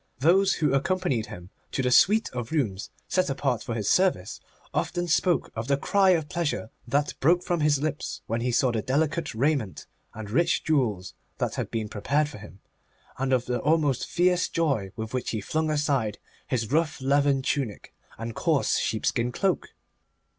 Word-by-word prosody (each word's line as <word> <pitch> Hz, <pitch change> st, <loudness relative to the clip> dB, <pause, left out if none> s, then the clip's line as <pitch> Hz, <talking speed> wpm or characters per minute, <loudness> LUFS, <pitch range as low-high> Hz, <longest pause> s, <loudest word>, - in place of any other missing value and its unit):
Those 190 Hz, +7 st, +4 dB
who 150 Hz, -4 st, +1 dB
accompanied 140 Hz, -5 st, 0 dB
him 90 Hz, +1 st, -10 dB, 0.2 s
to 135 Hz, -, 0 dB
the 125 Hz, -, +1 dB
suite 215 Hz, -, +5 dB
of 120 Hz, -2 st, -5 dB
rooms 110 Hz, -12 st, -1 dB, 0.2 s
set 185 Hz, -3 st, +1 dB
apart 135 Hz, -3 st, -1 dB
for 120 Hz, -4 st, -4 dB
his 105 Hz, -3 st, -2 dB
service, 180 Hz, -, +2 dB, 0.3 s
often 175 Hz, -1 st, -1 dB
spoke 175 Hz, +1 st, +1 dB
of 110 Hz, +1 st, -4 dB
the 140 Hz, 0 st, +2 dB
cry 195 Hz, +6 st, +3 dB
of 165 Hz, -5 st, +2 dB
pleasure 170 Hz, -10 st, -2 dB, 0.2 s
that 145 Hz, +4 st, 0 dB
broke 175 Hz, +5 st, +3 dB
from 175 Hz, -1 st, -1 dB
his 150 Hz, -2 st, +3 dB
lips 155 Hz, +1 st, -3 dB
when 115 Hz, +1 st, -2 dB
he 125 Hz, +1 st, 0 dB
saw 125 Hz, +1 st, +2 dB
the 115 Hz, -2 st, -1 dB
delicate 150 Hz, +4 st, -1 dB
raiment 130 Hz, -5 st, 0 dB, 0.3 s
and 105 Hz, -2 st, -7 dB
rich 165 Hz, +7 st, +2 dB
jewels 110 Hz, -, 0 dB, 0.2 s
that -, -, -1 dB
had -, -, -3 dB
been 110 Hz, -2 st, -3 dB
prepared 140 Hz, +9 st, 0 dB
for 105 Hz, -, -10 dB
him, 100 Hz, -2 st, -13 dB, 0.6 s
and 135 Hz, 0 st, 0 dB
of 125 Hz, -2 st, +2 dB
the 125 Hz, 0 st, -1 dB
almost 150 Hz, -2 st, +1 dB
fierce 180 Hz, 0 st, +2 dB
joy 135 Hz, -, 0 dB
with 110 Hz, +1 st, -6 dB
which 130 Hz, -, -2 dB
he 110 Hz, -, -2 dB
flung 155 Hz, +9 st, -1 dB
aside 140 Hz, -8 st, 0 dB, 0.3 s
his 120 Hz, -3 st, -2 dB
rough 155 Hz, -1 st, +1 dB
leathern 140 Hz, 0 st, +2 dB
tunic 130 Hz, -, -2 dB, 0.2 s
and 115 Hz, 0 st, -5 dB
coarse 160 Hz, 0 st, +1 dB
sheepskin 115 Hz, +2 st, 0 dB
cloak. 190 Hz, +7 st, -1 dB
140 Hz, 175 wpm, -26 LUFS, 115-160 Hz, 0.6 s, suite